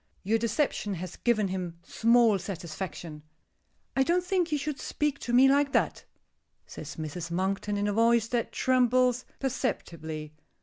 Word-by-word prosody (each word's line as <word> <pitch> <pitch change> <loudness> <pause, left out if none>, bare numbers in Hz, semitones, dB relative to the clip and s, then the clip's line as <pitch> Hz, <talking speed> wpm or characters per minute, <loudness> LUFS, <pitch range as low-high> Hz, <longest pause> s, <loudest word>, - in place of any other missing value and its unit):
Your 220 +4 +2
deception 225 -3 0
has 180 0 -7
given 215 -5 +1
him 180 -3 -4
small 230 -3 +3
satisfaction." 170 -3 -6 0.7
"I 270 - +3
don't 345 +6 +2
think 360 -3 0
you 300 - +2
should 295 0 -4
speak 295 -2 -1
to 240 - -4
me 255 +2 +7
like 280 +1 +3
that," - - 0 0.6
says - - -8
Mrs. 160 +2 -5
Monkton, 195 +4 -1
in 205 0 0
a 205 - 0
voice 230 +1 +3
that 240 -1 -1
trembles 255 -1 +2
perceptibly. 160 - -3
225 Hz, 145 wpm, -28 LUFS, 185-260 Hz, 0.7 s, me